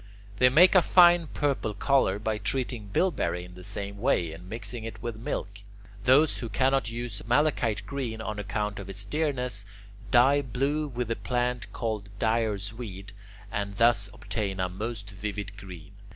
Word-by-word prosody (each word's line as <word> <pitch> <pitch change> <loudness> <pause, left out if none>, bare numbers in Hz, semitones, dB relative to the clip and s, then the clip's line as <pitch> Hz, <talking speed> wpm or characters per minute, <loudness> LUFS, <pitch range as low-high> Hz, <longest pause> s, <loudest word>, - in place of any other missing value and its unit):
They 125 - +7
make 170 +8 +7
a 185 - +7
fine 175 -2 +6
purple 140 -8 -1
colour 115 -4 +2
by 110 0 -2
treating 120 0 -2
bilberry 90 - 0
in 90 - -13
the 90 0 -11
same 100 +1 -5
way 85 -7 +1
and 90 +3 -11
mixing 115 +1 -4
it 110 -1 -7
with 120 -2 -3
milk. 100 -2 -4 0.5
Those 140 +4 +5
who 115 - -5
cannot 130 0 +2
use 115 -2 -5
malachite 120 -5 +1
green 125 -4 -4
on 110 -1 -4
account 105 0 -2
of 100 -1 -8
its 100 +1 -1
dearness, 125 -6 -1 0.5
dye 135 +3 +5
blue 140 +4 -1
with 125 -4 -4
the 115 - 0
plant 125 -3 -2
called 110 -3 -3
dyer's 110 -2 0
weed, 100 -4 -8 0.4
and 100 0 -3
thus 110 -2 +3
obtain 100 -4 -4
a 90 0 0
most 105 +2 -5
vivid 105 0 -5
green. 95 -4 -10
110 Hz, 165 wpm, -28 LUFS, 100-125 Hz, 0.5 s, They